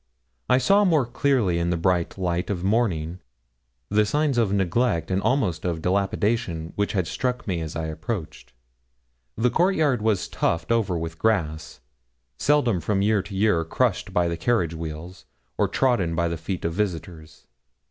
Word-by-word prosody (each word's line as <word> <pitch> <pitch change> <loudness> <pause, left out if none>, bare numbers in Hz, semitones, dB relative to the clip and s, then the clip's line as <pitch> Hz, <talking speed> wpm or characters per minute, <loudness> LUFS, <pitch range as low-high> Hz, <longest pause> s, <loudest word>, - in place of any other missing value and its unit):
I 125 - +5
saw 200 +10 +4
more 160 -9 +3
clearly 120 -8 +1
in 85 0 0
the 85 - 0
bright 90 +1 0
light 90 -1 -1
of 90 -4 -2
morning 95 -6 0 0.7
the 105 +1 +3
signs 140 +3 +1
of 110 -4 +2
neglect 95 -1 +1
and 95 +1 +1
almost 110 - 0
of 85 -3 -1
dilapidation 95 -2 0
which 100 0 -1
had 95 -4 +1
struck 125 +10 -2
me 90 -4 -1
as 80 -1 -5
I 80 -1 -2
approached. 80 +3 -5 0.9
The 120 +2 +2
court 185 +3 +2
yard 140 -7 +2
was 105 -4 +1
tufted 85 +6 -1
over 100 -7 +1
with 80 0 -5
grass, 80 - -1 0.6
seldom 130 -11 +2
from 100 +3 0
year 105 -1 +3
to 100 +1 -9
year 95 -4 +2
crushed 80 - 0
by 90 -1 +2
the 85 0 -2
carriage 90 -4 +1
wheels, 80 +2 -7 0.3
or - - +2
trodden 100 -11 +1
by 85 0 +1
the 85 - -2
feet 85 +3 -5
of 85 - -1
visitors. 85 -5 -4
95 Hz, 170 wpm, -24 LUFS, 85-115 Hz, 0.9 s, I